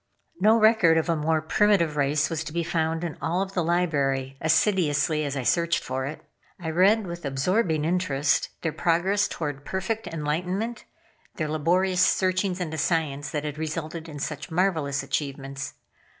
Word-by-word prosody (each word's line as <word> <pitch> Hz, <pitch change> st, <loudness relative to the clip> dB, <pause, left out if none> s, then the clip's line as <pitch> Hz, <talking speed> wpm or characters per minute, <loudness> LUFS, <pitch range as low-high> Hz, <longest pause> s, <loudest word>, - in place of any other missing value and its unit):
No 220 Hz, +2 st, +5 dB
record 215 Hz, -7 st, +5 dB
of 160 Hz, -, 0 dB
a 165 Hz, -, +3 dB
more 155 Hz, 0 st, 0 dB
primitive 170 Hz, -3 st, +2 dB
race 145 Hz, +1 st, +2 dB
was 160 Hz, -1 st, -2 dB
to -, -, -6 dB
be 170 Hz, +1 st, -1 dB
found 160 Hz, 0 st, -1 dB
in 170 Hz, -3 st, -5 dB
all 180 Hz, +4 st, 0 dB
the 190 Hz, -2 st, -2 dB
Library, 140 Hz, -6 st, 0 dB
assiduously 155 Hz, -3 st, +2 dB
as 140 Hz, -1 st, -3 dB
I 130 Hz, -, -2 dB
searched 170 Hz, +5 st, +1 dB
for 130 Hz, +1 st, -3 dB
it. 150 Hz, -, -7 dB, 0.4 s
I 165 Hz, -2 st, -3 dB
read 195 Hz, +6 st, +4 dB
with 175 Hz, -1 st, -7 dB
absorbing 155 Hz, +4 st, 0 dB
interest 155 Hz, -5 st, +1 dB
their 165 Hz, -, 0 dB
progress 180 Hz, +6 st, +1 dB
toward 145 Hz, -3 st, -5 dB
perfect 190 Hz, +7 st, -3 dB
enlightenment, 180 Hz, +9 st, -3 dB, 0.5 s
their 155 Hz, -2 st, -2 dB
laborious 180 Hz, +4 st, +1 dB
searchings 185 Hz, +1 st, +1 dB
into 160 Hz, -3 st, -3 dB
science 145 Hz, -3 st, 0 dB
that 150 Hz, 0 st, -3 dB
had 150 Hz, 0 st, -5 dB
resulted 160 Hz, +1 st, -4 dB
in 150 Hz, -, -8 dB
such 145 Hz, +1 st, -5 dB
marvelous 160 Hz, -6 st, 0 dB
achievements. 135 Hz, -1 st, -4 dB
160 Hz, 160 wpm, -26 LUFS, 150-180 Hz, 0.5 s, No